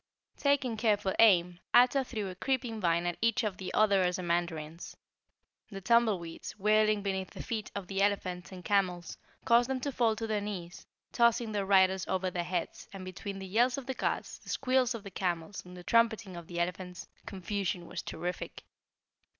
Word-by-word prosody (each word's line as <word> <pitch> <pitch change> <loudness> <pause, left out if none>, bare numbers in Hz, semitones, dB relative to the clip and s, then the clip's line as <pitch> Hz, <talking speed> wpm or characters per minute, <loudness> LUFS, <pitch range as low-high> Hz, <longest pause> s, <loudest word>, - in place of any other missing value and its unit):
Taking 275 -5 +1
careful 210 -3 +1
aim, 180 -5 +5 0.2
Ato 250 +3 +6
threw 220 -6 -4
a - - -6
creeping 240 +1 -2
vine 170 -1 +2
at 175 -1 -2
each 230 +1 +2
of 210 -4 -2
the 190 - -5
other 200 -3 +4
Ozamandarins. 170 -3 -2 0.7
The 195 -3 -7
tumbleweeds, 195 -5 +1
whirling 215 0 +3
beneath 190 -2 -2
the - - -8
feet 220 -2 -3
of 200 -2 -4
the 195 +2 -2
elephants 190 -3 0
and 180 -1 -10
camels, 185 -4 0 0.3
caused 235 +1 +4
them 265 -1 -1
to 285 - -2
fall 230 -4 +2
to 225 - -4
their 215 -2 -1
knees, 185 -4 -6 0.2
tossing 235 -1 +3
their 200 -2 -2
riders 190 -1 +4
over 185 0 -1
their 175 -1 -2
heads, 175 -1 -4
and 190 -1 -8
between 195 +2 -6
the 190 - -6
yells 240 +7 +2
of 275 - -6
the 265 - -3
guards, - - -2
the - - -14
squeals 255 -2 +1
of 220 - -7
the 200 - -9
camels, 175 0 -3
and 180 0 -11
trumpeting 225 -4 +2
of 170 -1 -9
the 170 -1 -5
elephants, 180 0 -3 0.2
confusion 190 -2 -3
was 175 +1 -5
terrific. 175 +2 -5
195 Hz, 180 wpm, -31 LUFS, 180-225 Hz, 0.7 s, Ato